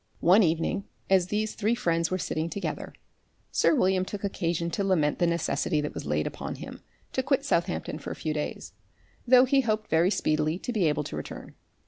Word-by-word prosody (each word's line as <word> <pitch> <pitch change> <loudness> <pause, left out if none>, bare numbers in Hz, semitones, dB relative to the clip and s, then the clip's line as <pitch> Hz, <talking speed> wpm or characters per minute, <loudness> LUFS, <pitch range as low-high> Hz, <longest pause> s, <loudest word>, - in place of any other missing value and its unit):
One 185 +6 +6
evening, 170 +3 0 0.3
as 185 -2 +4
these 215 +2 -1
three 220 +2 0
friends 170 -7 0
were 185 - 0
sitting 165 -2 -2
together, 200 - -4 0.6
sir - - +3
William 190 -7 +2
took 200 +2 -6
occasion 170 -4 -1
to 200 - -1
lament 165 -7 +1
the 175 - +3
necessity 160 -2 0
that 150 0 -3
was - - -6
laid 75 +1 0
upon - - -5
him - - -9 0.3
to 260 - +1
quit 275 +1 0
Southampton 170 - -1
for - - -7
a - - -4
few 155 - -3
days, 150 -1 -4 0.5
though 250 +1 +7
he 270 +1 +3
hoped 215 -3 -2
very 165 +3 +4
speedily 155 -3 +1
to 245 - -5
be 205 -6 +2
able 150 0 0
to 140 - -6
return. 75 - -7
180 Hz, 195 wpm, -27 LUFS, 160-210 Hz, 0.6 s, though